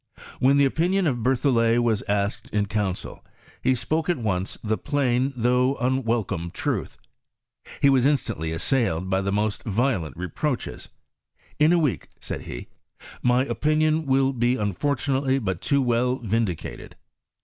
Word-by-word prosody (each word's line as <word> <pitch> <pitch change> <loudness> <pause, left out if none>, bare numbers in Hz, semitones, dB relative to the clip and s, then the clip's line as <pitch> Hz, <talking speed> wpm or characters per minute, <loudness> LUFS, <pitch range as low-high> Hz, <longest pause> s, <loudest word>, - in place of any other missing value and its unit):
When 135 +2 +4
the 140 - +5
opinion 175 +7 +1
of 125 -6 0
Berthollet 120 -2 +2
was 110 -4 +1
asked 100 0 -1
in 105 -1 0
council, 100 -2 -3 0.4
he 130 - +2
spoke 155 +7 -1
at 175 - +2
once 95 -5 -2
the 110 0 +1
plain, 130 -1 0
though 125 +3 +2
unwelcome 115 -9 -1
truth. - - -3 0.9
He - - +7
waa 135 - +5
instantly 125 - 0
assailed 95 -1 0
by 95 0 +2
the 100 0 -1
most 105 +1 0
violent 105 - -1
reproaches. 120 - -3 0.4
" - - -34
In 150 +2 +5
a 175 - +5
week," 150 -7 0
said - - -5
he, - - -7 0.3
" - - -15
my 125 +1 +3
opinion 155 +1 +1
will 135 0 +3
be 120 0 +1
unfortunately 130 +5 0
but 95 -8 -2
too 140 -1 +2
well 125 +1 +1
vin 115 -2 0
dicated." 85 -4 -7
125 Hz, 150 wpm, -24 LUFS, 105-135 Hz, 0.9 s, He